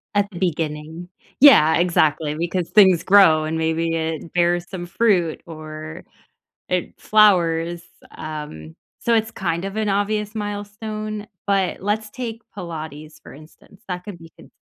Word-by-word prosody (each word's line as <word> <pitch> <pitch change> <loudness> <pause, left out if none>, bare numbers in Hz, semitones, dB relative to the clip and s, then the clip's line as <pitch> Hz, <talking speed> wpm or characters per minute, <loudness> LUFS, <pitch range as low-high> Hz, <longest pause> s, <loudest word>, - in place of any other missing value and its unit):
at 205 0 +2
the 175 - -8
beginning. 160 -1 -3 0.3
Yeah, 160 - +8
exactly, 155 -3 +1
because 170 +2 -2
things 190 -5 +5
grow 185 -6 +6
and 160 +1 -2
maybe 160 +1 0
it 160 0 -3
bears 175 0 +1
some 180 -3 -6
fruit 175 -4 +1
or 155 -1 -9 0.6
it 180 -1 -2
flowers, 175 -5 +3 0.3
um, 150 - -7 0.3
so 235 - +1
it's, 225 0 +1
kind 170 -3 -2
of, 195 +1 -5
an 215 -1 -1
obvious 210 +1 -1
milestone, 210 +1 -5 0.2
but 195 -3 0
let's 210 +2 -2
take 230 -2 -6
Pilates 155 -3 -8
for - - -13
instance. 155 +6 -18
That 180 -1 -4
could 205 -4 -8
be 165 -1 -14
con - - -16
175 Hz, 145 wpm, -21 LUFS, 160-205 Hz, 0.6 s, Yeah